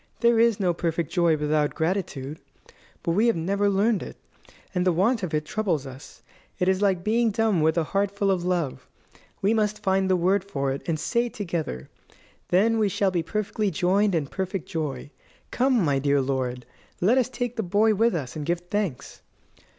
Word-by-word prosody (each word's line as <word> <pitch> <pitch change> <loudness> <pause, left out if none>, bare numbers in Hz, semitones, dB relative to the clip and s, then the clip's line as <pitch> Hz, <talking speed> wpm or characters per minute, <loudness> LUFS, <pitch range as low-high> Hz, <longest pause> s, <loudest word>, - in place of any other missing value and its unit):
There 235 -1 +4
is 230 -2 +3
no 180 -3 +2
perfect 165 -2 -2
joy 170 -3 +3
without 150 0 0
gratitude. 160 -5 -2 0.6
But 170 - 0
we 210 +7 +3
have 230 - +3
never 200 +5 0
learned 200 +2 +2
it, - - -8 0.6
and 180 -1 +1
the 185 - +3
want 205 +7 +2
of 180 -4 -3
it 150 -1 -1
troubles 175 -7 -1
us. 130 +1 -12 0.3
It 180 - 0
is 190 +1 +2
like 190 -3 +2
being 230 +3 +2
dumb 215 -4 +1
with 160 +2 +2
a 165 - +3
heart 195 +5 0
full 200 0 0
of 180 -2 0
love. 175 -6 -2 0.6
We 205 +3 +3
must 210 -1 0
find 190 0 +1
the 185 - +4
word 185 +3 +2
for 140 -9 -2
it, 135 - -4
and 160 -2 -1
say 235 +6 0
it - - -12
together. 165 - -4 0.6
Then 220 +5 +3
we 210 -2 +2
shall 195 0 +1
be 175 -2 0
perfectly 210 +3 -2
joined 190 +3 +2
in 155 -3 0
perfect 190 +4 -4
joy. 145 -4 -4 0.4
Come, 250 -6 +2
my 140 -2 +2
dear 140 +1 +2
lord, 130 -2 -2 0.3
let 225 +9 +4
us 250 - 0
take 245 -1 -3
the 225 - -1
boy 210 +3 +2
with 225 0 +2
us, 135 -7 -4
and 155 - -4
give 170 +3 -1
thanks." 200 - -3
185 Hz, 195 wpm, -25 LUFS, 160-210 Hz, 0.6 s, There